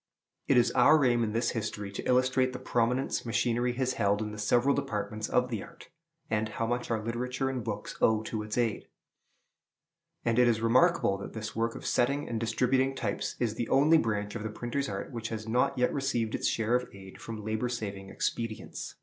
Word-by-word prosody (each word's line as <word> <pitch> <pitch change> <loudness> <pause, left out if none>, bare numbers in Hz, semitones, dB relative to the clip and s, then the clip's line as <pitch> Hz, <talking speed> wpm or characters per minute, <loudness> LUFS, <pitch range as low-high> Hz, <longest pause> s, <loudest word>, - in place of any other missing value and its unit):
It - - +4
is 120 - +4
our 150 -2 +5
aim 120 -1 +3
in 105 -1 -2
this 115 +2 +1
history 105 -3 -4
to 100 - -5
illustrate 130 0 +3
the - - -4
prominence 125 +1 0
machinery 120 +1 0
has 130 +1 0
held 100 0 +3
in 105 -1 -3
the 105 - -8
several 120 +6 +3
departments 110 -1 -3
of 125 0 +2
the 110 - -2
art, 170 0 -13 0.4
and 110 0 0
how 115 - -2
much 120 +1 -2
our 115 -1 +1
literature 125 +3 -2
and 125 -3 -3
books 105 -2 -5
owe 110 -1 +3
to 110 -1 -3
its 105 +1 -5
aid; 115 -4 0 1.4
and 115 0 +2
it 125 - +6
is 115 -2 +2
remarkable 115 - +3
that - - -7
this 110 -1 -6
work 115 +1 0
of - - -8
setting 140 +4 +1
and 115 - -2
distributing 130 +4 +1
types 110 -6 -2
is 115 -3 0
the 115 +1 -3
only 155 +4 +5
branch 105 -5 -1
of 120 - -5
the 110 - -3
printer's 120 +5 -3
art 100 +5 -5
which 115 -3 -4
has 110 -1 -5
not 125 +4 +1
yet 125 0 +2
received 120 -5 -1
its - - 0
share 115 +1 0
of 125 0 +1
aid 95 -1 -12
from 110 -2 -7
labor 110 +3 -1
saving 100 -5 -5
expedients. 115 +1 -4
115 Hz, 205 wpm, -29 LUFS, 110-125 Hz, 1.4 s, it